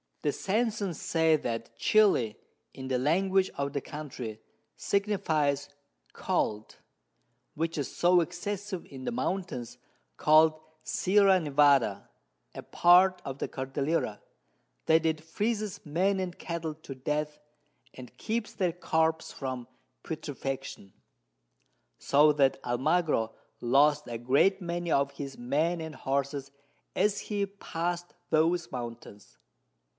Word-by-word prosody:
The 150 Hz, -, +2 dB
Sansons 205 Hz, -1 st, -1 dB
say 160 Hz, -1 st, +3 dB
that 115 Hz, -6 st, -4 dB
Chili, 195 Hz, -, +3 dB, 0.4 s
in 130 Hz, -1 st, -7 dB
the 130 Hz, -1 st, +1 dB
Language 185 Hz, +7 st, +2 dB
of 140 Hz, 0 st, -2 dB
the 140 Hz, -, -1 dB
Country, 130 Hz, -8 st, -7 dB, 0.4 s
signifies 160 Hz, -9 st, 0 dB, 0.4 s
Cold, 105 Hz, 0 st, -2 dB, 0.8 s
which 165 Hz, +1 st, -2 dB
is 145 Hz, -, -4 dB
so 175 Hz, 0 st, +4 dB
excessive 185 Hz, +3 st, -4 dB
in 130 Hz, -2 st, -9 dB
the -, -, -1 dB
Mountains 180 Hz, -, -3 dB, 0.4 s
call'd 155 Hz, +1 st, +5 dB, 0.2 s
Sierra 195 Hz, 0 st, +4 dB
Nevada, 140 Hz, -, +3 dB, 0.4 s
a -, -, -7 dB
part 180 Hz, +2 st, +5 dB
of 135 Hz, -1 st, -5 dB
the -, -, -2 dB
Cordillera, 135 Hz, -3 st, -2 dB, 0.6 s
that 160 Hz, 0 st, +4 dB
it 160 Hz, -1 st, -1 dB
freezes 210 Hz, +5 st, -2 dB
Men 185 Hz, +6 st, +1 dB
and 180 Hz, -2 st, -4 dB
Cattle 170 Hz, -2 st, -4 dB
to 150 Hz, -3 st, -9 dB
Death, 150 Hz, +3 st, -3 dB, 0.5 s
and 125 Hz, -2 st, -12 dB
keeps 225 Hz, 0 st, -3 dB
their 180 Hz, -4 st, 0 dB
Corps 160 Hz, -2 st, 0 dB
from 130 Hz, -3 st, -5 dB, 0.4 s
Putrefaction; 135 Hz, -, -5 dB, 1.1 s
so 150 Hz, +2 st, +5 dB
that 140 Hz, -2 st, +2 dB
Almagro 125 Hz, -1 st, +1 dB, 0.3 s
lost 145 Hz, +4 st, +3 dB
a 120 Hz, -1 st, -4 dB
great 140 Hz, -, +3 dB
many 175 Hz, -1 st, -3 dB
of 140 Hz, 0 st, +2 dB
his 140 Hz, -1 st, -7 dB
Men 155 Hz, +8 st, 0 dB
and 160 Hz, -1 st, -6 dB
Horses 140 Hz, +1 st, -2 dB, 0.4 s
as 205 Hz, -1 st, +1 dB
he 205 Hz, -2 st, -1 dB
past 175 Hz, -3 st, -4 dB, 0.2 s
those 165 Hz, +2 st, +2 dB
Mountains. 115 Hz, -4 st, -8 dB
155 Hz, 120 wpm, -29 LUFS, 135-180 Hz, 1.1 s, call'd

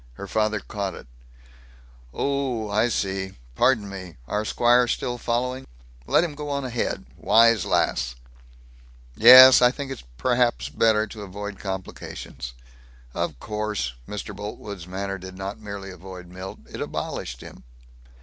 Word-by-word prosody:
Her 100 Hz, -, -8 dB
father 110 Hz, +1 st, 0 dB
caught 100 Hz, -1 st, -4 dB
it: -, -, -11 dB, 1.1 s
"Oh, 130 Hz, -, -1 dB
I 110 Hz, +4 st, +2 dB
see. 95 Hz, -3 st, -2 dB, 0.2 s
Pardon 110 Hz, -, +2 dB
me. 95 Hz, -5 st, -8 dB
Our 105 Hz, +7 st, -1 dB
squire 120 Hz, +2 st, +4 dB
still 120 Hz, 0 st, -2 dB
following? 125 Hz, +3 st, -2 dB, 0.4 s
Let -, -, +4 dB
him 170 Hz, -4 st, -3 dB
go 145 Hz, 0 st, -6 dB
on 140 Hz, -1 st, -2 dB
ahead? 120 Hz, -2 st, -2 dB
Wise 115 Hz, -2 st, +5 dB
lass." 60 Hz, 0 st, +1 dB, 1.0 s
"Yes. 130 Hz, -, +10 dB
I 125 Hz, -, +7 dB
think 135 Hz, +1 st, -5 dB, 0.2 s
perhaps -, -, +1 dB
it's 75 Hz, -, -21 dB
better 110 Hz, -1 st, +3 dB
to 110 Hz, 0 st, -10 dB
avoid 100 Hz, +1 st, -7 dB
complications." 95 Hz, -9 st, -6 dB, 0.6 s
"Of 70 Hz, -, -3 dB
course." 105 Hz, -, -3 dB
Mr. 105 Hz, 0 st, -6 dB
Boltwood's 100 Hz, -3 st, -7 dB
manner 95 Hz, +1 st, -4 dB
did 95 Hz, 0 st, -10 dB
not 95 Hz, +1 st, -5 dB
merely 100 Hz, -2 st, -7 dB
avoid 90 Hz, 0 st, -10 dB
Milt; 95 Hz, +1 st, -8 dB
it -, -, -8 dB
abolished 60 Hz, -1 st, -4 dB
him. -, -, -12 dB
105 Hz, 140 wpm, -24 LUFS, 95-120 Hz, 1.1 s, Yes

